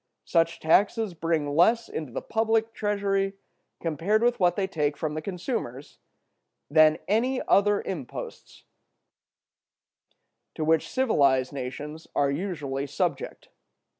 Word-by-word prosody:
Such 165 -1 +1
taxes 200 +5 +2
bring 160 -3 -1
less 225 +8 +4
into 155 -5 -6
the - - -5
public 225 0 0
treasury, 200 -2 0 0.5
compared 175 +7 0
with 240 0 +2
what 175 -2 +3
they 195 - 0
take 150 -6 -1
from 155 0 -2
the 155 - -3
consumers, 170 - -5 0.7
than 155 0 +6
any 250 +6 +1
other 205 0 +3
imposts 150 -10 -7 1.9
to 155 - -2
which 160 0 +2
civilized 140 - +2
nations 145 +4 -6
are 140 -1 +2
usually 145 -5 -3
subject. - - -3
165 Hz, 115 wpm, -26 LUFS, 150-205 Hz, 1.9 s, than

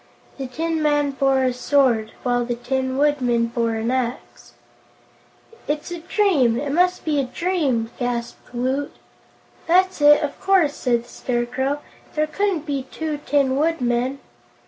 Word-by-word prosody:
This 255 -2 -6
tin 325 0 -1
man 290 -1 +2
bore 270 -1 +2
a 255 -1 +1
sword, 250 -4 +2
while 245 -1 +1
the 240 0 -2
Tin 260 +2 -2
Woodman 255 -5 +2
bore 230 -1 -1
an 225 +2 -1
axe. 255 -1 -4 1.1
"It's 295 +3 -3
a 345 - -4
dream; 325 - +2
it 285 -1 -3
must 360 +4 +2
be 300 -2 +1
a 275 - +1
dream!" 270 -7 -1
gasped 240 -1 -4
Woot. 260 +4 -2 0.7
"That's 370 0 +3
it, 295 +1 +7
of 285 -1 -4
course," 375 -7 +3
said 240 -4 0
the - - -19
Scarecrow; 255 +4 -2 0.3
"there 305 0 +2
couldn't 365 -1 -1
be 275 -3 -3
two 310 -2 -4
Tin 275 -2 +2
Woodmen." 265 -4 0
275 Hz, 145 wpm, -22 LUFS, 245-305 Hz, 1.1 s, it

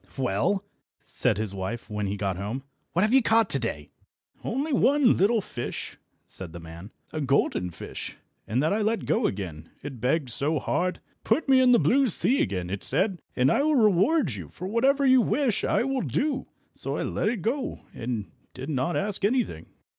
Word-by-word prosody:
"Well," 135 - 0 0.4
said 125 -5 0
his 105 -2 -2
wife, 100 +5 -4
when 105 -2 -3
he 100 +1 -3
got 95 -2 -1
home, 105 +8 -4 0.3
"what 175 - +2
have 215 +3 +2
you 265 - +7
caught 225 -2 +3
to 135 - +1
day?" 75 - -4 0.5
"Only 280 +5 -2
one 270 -1 +4
little 215 +4 +3
fish," 120 -9 -6 0.3
said 90 -4 -7
the 85 - -7
man, 85 +4 -10 0.2
"a 155 - -2
golden 135 -9 +1
fish, 85 - -8 0.3
and 125 +6 0
that 160 - +2
I 215 - 0
let 220 +2 0
go 225 0 +2
again, 85 -5 -6
it 135 -5 -7
begged 130 +1 0
so 150 +6 0
hard. 180 +6 -1 0.2
'Put 315 - +1
me 265 -1 +6
in 255 -1 +5
the 240 - +7
blue 270 +3 +3
sea 245 +5 +4
again,' 90 -2 -2
it 100 - -4
said, 190 -3 +1
'and 130 +2 +3
I - - +3
will 305 +1 +2
reward 215 - +3
you, 90 -8 -7
for 180 - -7
whatever 270 +7 +2
you 260 -1 +6
wish 255 -2 +1
I - - +2
will 270 0 -1
do.' 295 0 -1 0.3
So - - -4
I - - -1
let - - 0
it 220 -7 -3
go, 260 +3 -2
and 115 -3 -3 0.3
did - - -5
not 135 +5 0
ask 200 0 -2
anything." 210 - 0
170 Hz, 195 wpm, -26 LUFS, -, 0.5 s, you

